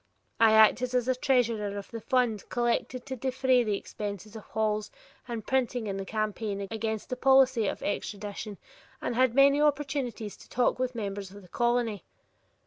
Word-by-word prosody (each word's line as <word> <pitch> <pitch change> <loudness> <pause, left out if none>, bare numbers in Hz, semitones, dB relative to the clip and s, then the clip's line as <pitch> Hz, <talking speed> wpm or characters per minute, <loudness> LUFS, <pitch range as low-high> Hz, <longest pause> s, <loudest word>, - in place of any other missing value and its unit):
I 225 -1 +6
acted 245 +3 +5
as 250 +1 +2
treasurer 230 -7 +1
of 200 - -8
the 230 -1 -6
fund 240 -4 0
collected 240 +1 -1
to 265 -1 -4
defray 260 0 +2
the 210 -3 0
expenses 205 +1 -7
of 220 - -7
halls 215 -1 -1 0.4
and 230 -3 -5
printing 250 -3 0
in 195 -2 -3
the 195 - -4
campaign 215 -1 -2
against 220 -1 -3
the 255 - -2
policy 260 -3 +4
of - - -4
extradition 205 0 -4 0.4
and - - -2
had 250 0 +2
many 280 +1 +6
opportunities 275 -7 -1
to - - -16
talk 250 0 +1
with 255 -1 -1
members 200 -3 -4
of 200 +1 -13
the - - -15
colony. 235 -2 0
230 Hz, 165 wpm, -28 LUFS, 210-255 Hz, 0.4 s, I